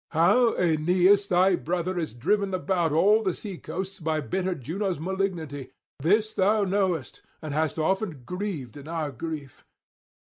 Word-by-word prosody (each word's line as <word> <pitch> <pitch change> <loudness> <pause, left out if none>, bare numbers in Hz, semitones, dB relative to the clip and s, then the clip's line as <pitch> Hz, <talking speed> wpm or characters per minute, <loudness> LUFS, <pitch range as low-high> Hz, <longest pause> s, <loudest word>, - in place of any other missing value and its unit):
How 225 +9 +4
Aeneas 180 +4 +3
thy 185 0 +4
brother 175 +2 -2
is 160 -8 -4
driven 195 - +1
about 180 -3 0
all 205 +8 +4
the 190 -5 -1
sea 195 -5 -7
coasts 190 +2 -5
by 160 -1 -1
bitter 185 +4 -2
Juno's 175 - -3
malignity, 165 -6 -3 0.3
this 210 +9 +2
thou 205 +2 +3
knowest, 185 -7 -1 0.2
and 155 -2 -6
hast 155 +1 0
often 165 - -1
grieved 180 - -4
in 145 +1 -10
our 160 -3 -3
grief. 145 +1 -7
180 Hz, 145 wpm, -26 LUFS, 155-195 Hz, 0.3 s, How